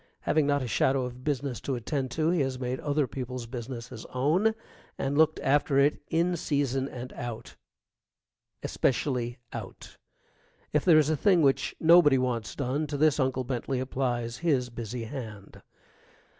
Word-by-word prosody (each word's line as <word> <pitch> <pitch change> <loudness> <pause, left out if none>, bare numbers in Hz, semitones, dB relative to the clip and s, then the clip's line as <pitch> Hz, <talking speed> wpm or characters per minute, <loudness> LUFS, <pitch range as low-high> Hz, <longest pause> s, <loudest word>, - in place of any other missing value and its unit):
Having 155 -2 +2
not 145 -1 +2
a - - -3
shadow 130 +3 +2
of 125 0 -8
business 140 -3 -2
to 135 - -2
attend 130 +2 -2
to 155 +5 0
he 175 - +1
has 130 -1 -1
made 125 0 -3
other 145 0 +1
people's 125 -1 -5
business 120 0 -6
his 110 - -9
own, 170 +13 +1 0.4
and 135 +1 -1
looked 155 +1 +3
after 140 0 +2
it 140 +2 +3
in 170 +2 +1
season 140 -4 -1
and 125 0 -8
out 120 -2 -7 1.1
especially 125 -2 0 0.2
out. - - -8 0.8
If 150 - +2
there 170 -4 +7
is 155 0 +4
a - - +2
thing 175 +2 +3
which 135 -1 +2
nobody 160 -4 +6
wants 120 -4 -2
done, 140 +3 -1
to 145 0 -3
this 150 0 +3
Uncle 130 -1 +1
Bentley 125 +1 -2
applies 125 -2 -2
his 135 -7 0
busy 120 0 -5
hand. 110 -5 -8
135 Hz, 160 wpm, -28 LUFS, 125-150 Hz, 1.1 s, there